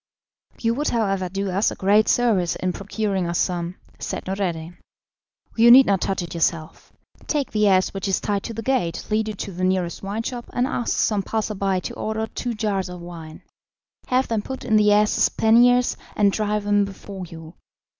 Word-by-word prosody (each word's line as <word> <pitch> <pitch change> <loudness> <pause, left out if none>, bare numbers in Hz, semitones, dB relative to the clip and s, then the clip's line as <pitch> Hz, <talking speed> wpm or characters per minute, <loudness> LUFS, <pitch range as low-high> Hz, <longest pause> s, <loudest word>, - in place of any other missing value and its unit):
"You 230 0 +1
would, 290 +5 -2
however, 195 -5 0
do 195 +1 -3
us 195 +4 +2
a - - -6
great 205 +3 +3
service 210 -8 +2
in 185 -1 -2
procuring 200 -2 -2
us 170 0 -1
some," 175 -1 -1 0.2
said - - -5
Noureddin. 175 -3 -3 0.8
"You 235 +1 +6
need 260 +2 +9
not 195 -4 +1
touch 190 -2 -1
it 170 - -7
yourself. 165 -1 -2 0.4
Take 290 -3 -1
the 210 -1 +2
ass 185 -1 +3
which 195 0 -4
is 190 - +1
tied 200 -1 -1
to 230 - -5
the 225 - -5
gate, 225 -11 -1
lead 215 0 +1
it 210 - -6
to 200 - -5
the 185 0 -5
nearest 185 -2 0
wine 205 +3 -4
shop, 240 0 -5
and 245 - +1
ask 245 -3 -2
some 210 -2 +1
passer 215 +2 -2
by 195 -2 -1
to - - -6
order 220 0 -3
two 235 +1 -4
jars 200 -4 -1
of 180 0 -8
wine; 165 -2 -10 0.6
have 255 +1 +1
them 225 -2 -1
put 265 +4 -7
in 220 - +2
the 210 -1 +5
ass's 210 0 +3
panniers, 245 +2 +4 0.2
and 205 -1 +3
drive 210 0 -1
him 205 0 +3
before 195 -1 -7
you. 165 0 -11
200 Hz, 195 wpm, -23 LUFS, 185-220 Hz, 0.8 s, need